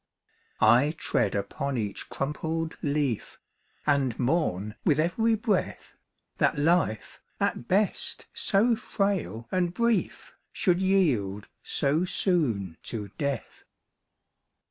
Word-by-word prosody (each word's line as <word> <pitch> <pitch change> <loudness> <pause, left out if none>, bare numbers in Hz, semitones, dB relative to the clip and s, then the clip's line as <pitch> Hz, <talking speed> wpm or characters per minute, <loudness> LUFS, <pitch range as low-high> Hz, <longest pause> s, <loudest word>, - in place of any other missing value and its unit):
I 125 +8 +5
tread 100 - 0
upon 130 +7 -2
each 105 -3 -3
crumpled 160 +3 -3
leaf, 140 -6 -1 0.5
And 140 -5 +2
mourn 120 - 0
with 150 -1 +3
every 220 +8 +2
breath, 210 -3 -2 0.4
That - - +2
life, 150 - +1 0.2
at 120 - -1
best 200 +2 0
so 225 +4 +3
frail 195 - -2
and 180 -2 0
brief, 235 -1 0 0.2
Should 180 -1 +1
yield 130 - +1
so 150 +4 +1
soon 120 - 0
to 105 -4 -5
death. 140 -4 -3
150 Hz, 100 wpm, -27 LUFS, 115-185 Hz, 0.5 s, I